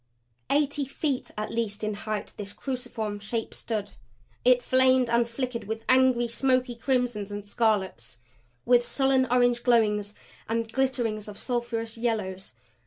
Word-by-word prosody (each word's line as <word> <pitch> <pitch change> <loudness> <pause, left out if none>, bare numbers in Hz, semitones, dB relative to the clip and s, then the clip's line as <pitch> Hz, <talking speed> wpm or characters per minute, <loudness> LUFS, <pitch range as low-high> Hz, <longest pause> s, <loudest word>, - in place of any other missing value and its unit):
Eighty 290 0 +1
feet 275 0 -2
at 215 - -3
least 220 -2 -2
in 215 0 0
height, 210 +1 -4
this 200 -1 -5
cruciform 240 -5 -4
shape 225 +2 -4
stood. 210 -3 -3 0.5
It 250 0 +5
flamed 260 -2 +4
and 235 0 +3
flickered 245 -1 -3
with 220 +2 -5
angry, 255 -2 +4
smoky 255 +1 +1
crimsons 240 -4 -1
and 205 0 -5
scarlets; 195 - 0 0.5
with 245 0 +5
sullen 265 0 +2
orange 245 -1 +3
glowings 210 -4 +2 0.3
and 230 0 0
glitterings 240 -6 0
of 205 -1 -9
sulphurous 230 -2 -3
yellows. 200 -5 -2
235 Hz, 135 wpm, -27 LUFS, 215-255 Hz, 0.5 s, It